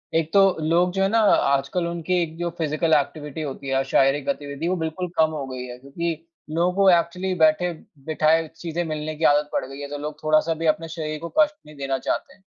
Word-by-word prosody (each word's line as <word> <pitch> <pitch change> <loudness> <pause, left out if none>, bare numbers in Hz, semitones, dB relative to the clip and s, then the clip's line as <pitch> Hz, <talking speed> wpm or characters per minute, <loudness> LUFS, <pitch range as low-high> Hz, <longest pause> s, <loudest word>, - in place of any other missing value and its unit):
एक 165 -1 +1
तो 200 - +7 0.2
लोग 170 +3 +2
जो 195 - 0
है - - +4
ना 230 - +3
आजकल 170 -4 +2
उनकी 170 +1 -1
एक 160 -1 -3
जो 175 0 -2
फिज़िकल 160 0 0
एक्टिविटी 150 +1 -1
होती 140 -2 -6
है 135 - -1
या 135 - +3
शारीरिक 135 +1 +3
गतिविधि 145 -2 -3
वो 185 - +1
बिल्कुल 160 +2 -3
कम 160 0 +5
हो 145 -3 -4
गई 130 -1 -6
है, 125 0 -8
क्योंकि 165 +5 -5 0.2
लोगों 170 +3 +1
को 195 -1 +5
एक्चुअली 180 +2 +1
बैठे-बिठाए 160 -1 +1
चीज़ें 170 0 -3
मिलने 155 0 -4
की 160 - -6
आदत 145 0 +4
पड़ - - 0
गई 135 +1 -10
है 145 - -5
तो 145 - -5
लोग 150 +1 -6
थोड़ा-सा 155 +1 +3
भी 165 - -1
अपने 155 +1 +1
शरीर 155 -2 -5
को 170 +1 -6
कष्ट 300 -1 +4
नहीं 150 - -13
देना 135 -1 -1
चाहते - - -3
हैं। 205 - -25
155 Hz, 225 wpm, -23 LUFS, 145-170 Hz, 0.2 s, तो